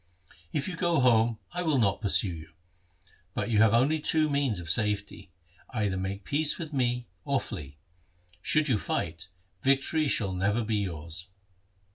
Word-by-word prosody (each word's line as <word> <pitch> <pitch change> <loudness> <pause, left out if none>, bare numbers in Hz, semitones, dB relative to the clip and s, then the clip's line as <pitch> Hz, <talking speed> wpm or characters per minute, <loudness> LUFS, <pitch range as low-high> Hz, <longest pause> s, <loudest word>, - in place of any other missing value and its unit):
If 140 -2 -2
you 185 - -4
go 170 -2 +1
home 115 -3 +3
I 180 - -3
will 160 -5 +1
not 100 -6 +1
pursue 100 -3 +2
you. 80 -1 -11 0.8
But 120 - -2
you 105 - +3
have 110 0 +5
only 140 +7 +3
two 155 0 +2
means 140 -8 0
of 85 - -8
safety, 105 +1 +1 0.4
either 105 -5 -1
make 95 +1 -4
peace 150 +5 +1
with 160 -3 -7
me 125 -2 0 0.2
or 140 -1 +1
flee. 70 - -7 0.6
Should 155 0 +2
you 120 -7 +2
fight, 80 +1 -3 0.3
victory 140 +3 +2
shall 100 -8 +1
never 100 +5 0
be 110 0 -1
yours.' 85 -2 -5
115 Hz, 160 wpm, -28 LUFS, 95-140 Hz, 0.8 s, have